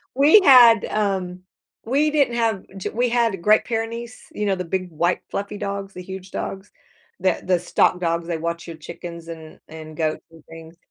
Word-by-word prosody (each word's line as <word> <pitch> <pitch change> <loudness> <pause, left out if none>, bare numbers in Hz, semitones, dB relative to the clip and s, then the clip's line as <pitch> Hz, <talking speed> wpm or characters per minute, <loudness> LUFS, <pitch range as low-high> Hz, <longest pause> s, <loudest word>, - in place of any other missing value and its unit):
We 300 +10 +6
had, 240 -6 +7
um 190 -4 -2 0.4
we 285 +6 +1
didn't 280 -5 +2
have 225 -5 0
g 190 - -4
we 245 +1 0
had 230 -6 0
Great 215 +4 +4
Pyrenees, 230 +1 -4
you 210 - -3
know, 195 - +1
the 180 -1 -5
big, 185 +1 -3
white, 170 +3 0
fluffy 200 +1 -4
dogs, 200 -1 -5
the 180 - -8
huge 190 0 -9
dogs, 195 +1 -6 0.5
the 185 -1 0
the 180 -2 +1
stock 180 0 +1
dogs. 170 -1 -1
They 170 -2 -2
watch 170 +1 -4
your 165 - -7
chickens 170 +1 -9
and 160 -2 -10
and 155 -1 -10
goats 155 -2 -2
and 160 -2 -17
things. 165 0 -12
190 Hz, 185 wpm, -22 LUFS, 170-225 Hz, 0.5 s, had